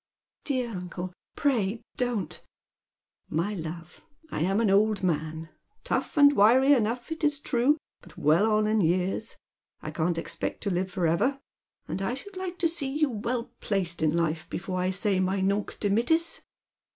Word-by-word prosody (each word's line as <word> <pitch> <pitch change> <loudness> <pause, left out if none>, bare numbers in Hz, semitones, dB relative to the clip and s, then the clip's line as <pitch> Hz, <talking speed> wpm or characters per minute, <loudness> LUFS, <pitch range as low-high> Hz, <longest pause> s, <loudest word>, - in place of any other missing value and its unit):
" - - -58
Dear 255 -4 -1
uncle, 180 -1 -6 0.2
pray 230 -7 0
don't 235 -9 -2 0.3
" - - -66
" - - -50
My 170 +7 -1
love, 170 -1 -7 0.3
I'm 190 +6 +1
an 220 -4 +3
old 205 0 +3
man, 160 -2 -1 0.2
— 425 - -44
tough - - -2
and 285 0 +7
wiry 255 +7 +6
enough, 240 +2 0
it 320 0 -4
is 295 -1 +2
true, 275 +1 +2 0.2
but - - -17
well 170 +9 +3
on 215 0 +3
in 215 0 +2
years. 180 +5 0 0.4
I - - -6
can't 165 +1 0
expect 165 - -3
to 200 - 0
live 185 +1 0
for 180 -2 -1
ever. 220 +13 +2 0.5
And 195 - -3
I 195 +6 -1
should 395 +9 -11
like 370 -1 -5
to 345 - +2
see 320 -5 -1
you 305 -3 +2
weU 235 +2 -3
placed 180 -5 -1
in 155 +1 +2
life 165 0 -1
before 185 0 -3
I 180 +1 +1
say 195 0 +2
my 190 +1 +1
nunc 200 +2 0
dimittis." 235 +12 +1
205 Hz, 175 wpm, -27 LUFS, 180-250 Hz, 0.5 s, and